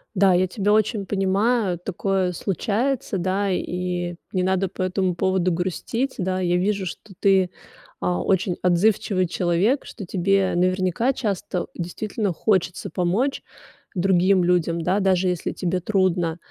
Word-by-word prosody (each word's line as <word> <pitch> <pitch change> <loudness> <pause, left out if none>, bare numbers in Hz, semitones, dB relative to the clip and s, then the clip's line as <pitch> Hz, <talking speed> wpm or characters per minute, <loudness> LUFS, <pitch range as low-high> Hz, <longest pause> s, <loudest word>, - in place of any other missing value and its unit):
Да, 190 0 +5
я 180 +1 +3
тебя 205 +2 0
очень 215 -2 +1
понимаю, 195 0 +1
такое 190 0 -1
случается, 215 - -1
да, 190 +3 0
и 180 -1 -2 0.2
не 185 -1 0
надо 190 +1 +1
по 185 - -4
этому 185 -1 0
поводу 185 0 +1
грустить. 185 +9 -2
Да, 185 0 -1
я 175 -1 +1
вижу, 195 +1 0
что 195 +3 -8
ты, 190 -3 +3 0.5
а, 90 -1 0
очень 185 - +1
отзывчивый 185 +1 +2
человек, 180 +10 +1
что 205 - -8
тебе 190 +1 +1
наверняка 185 +7 +1
часто 195 -6 -2
действительно 200 +3 -3
хочется 180 -1 0
помочь 200 +10 0 0.5
другим 185 0 +3
людям, 170 -1 +1
да, 185 +4 +1
даже 190 -2 +2
если 180 -2 -2
тебе 185 0 -2
трудно. 180 -3 +1
185 Hz, 140 wpm, -23 LUFS, 180-200 Hz, 0.5 s, Да